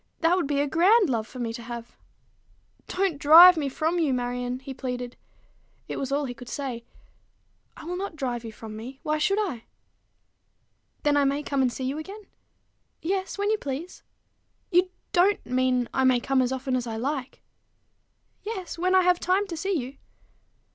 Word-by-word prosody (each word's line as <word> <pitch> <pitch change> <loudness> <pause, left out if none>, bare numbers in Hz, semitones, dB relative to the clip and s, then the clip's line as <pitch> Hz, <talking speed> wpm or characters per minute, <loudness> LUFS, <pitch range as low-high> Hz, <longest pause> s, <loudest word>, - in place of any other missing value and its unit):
That 335 +2 +4
would 360 -6 0
be 285 -1 0
a 290 - +1
grand 360 - +4
love 220 -2 -1
for 255 - -12
me 235 -2 -3
to 235 - -7
have." 235 0 -8 0.9
"Don't 370 -6 -1
drive 340 +5 +9
me 290 -4 -1
from 320 +6 -1
you, 290 -6 +2
Marion," 245 0 -2
he 265 +1 -8
pleaded. 250 -2 -5 0.7
It - - -5
was 270 0 -3
all 285 +1 0
he 245 - -5
could 245 0 -11
say. 260 -5 -4 0.9
"I - - -10
will 355 +2 -4
not 390 -3 -5
drive 245 -5 -3
you 225 - -7
from 220 0 -10
me. 250 +5 -9
Why 305 0 0
should 395 +6 +2
I?" 360 - -2 1.4
"Then 290 -1 +3
I 285 - +4
may 280 +2 0
come 280 -2 0
and 255 -2 +2
see 260 - -6
you 270 +4 -2
again?" 395 +7 -9 0.8
"Yes: 380 +3 -2
when 405 +1 0
you 435 - +1
please." 285 +6 -6 0.7
"You 365 +1 +4 0.2
don't 385 +3 +3
mean 250 -1 +1
I 265 - +1
may 255 -1 +4
come 265 +1 +1
as 255 0 0
often 260 0 -2
as 245 -1 -2
I 225 - -4
like?" 265 +2 -4 1.0
"Yes 380 -6 -6
when 370 +2 +2
I 375 - +6
have 355 -1 +3
time 375 +3 +1
to 360 -4 -6
see 380 +3 -1
you." 265 0 -6
280 Hz, 190 wpm, -26 LUFS, 250-355 Hz, 1.4 s, drive